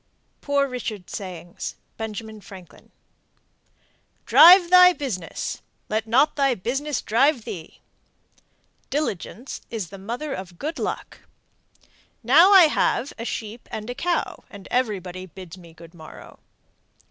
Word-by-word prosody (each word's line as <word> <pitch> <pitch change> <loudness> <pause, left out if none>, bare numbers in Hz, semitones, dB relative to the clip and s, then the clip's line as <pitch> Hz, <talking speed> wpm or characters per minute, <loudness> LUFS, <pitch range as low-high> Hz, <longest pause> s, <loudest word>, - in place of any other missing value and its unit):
POOR 280 -1 +1
RICHARD'S 225 -7 -6
SAYINGS. 175 -4 -7 0.2
(Benjamin 220 0 -7
Franklin.) 185 -4 -14 1.4
Drive 355 0 +8
thy 360 0 +8
business! 225 - -5 0.3
Let 220 +1 -1
not 270 +7 +3
thy 275 -3 +2
business 270 +8 -3
drive 255 +3 +2
thee! 165 -3 -9 1.1
Diligence 260 - -4
is 215 -7 -5
the 195 - -10
mother 245 +9 -5
of 185 -5 -8
good 315 - -5
luck. - - -5 1.0
Now 315 - +6
I 385 -3 +9
have 285 -3 +1
a 230 - -5
sheep 225 0 -6
and 215 +3 -5
a - - -4
cow, 340 +7 -2
everybody 195 -4 -3
bids 180 0 -11
me 170 -3 -15
good 165 +1 -15
morrow. 160 -2 -13
225 Hz, 120 wpm, -23 LUFS, 185-280 Hz, 1.4 s, I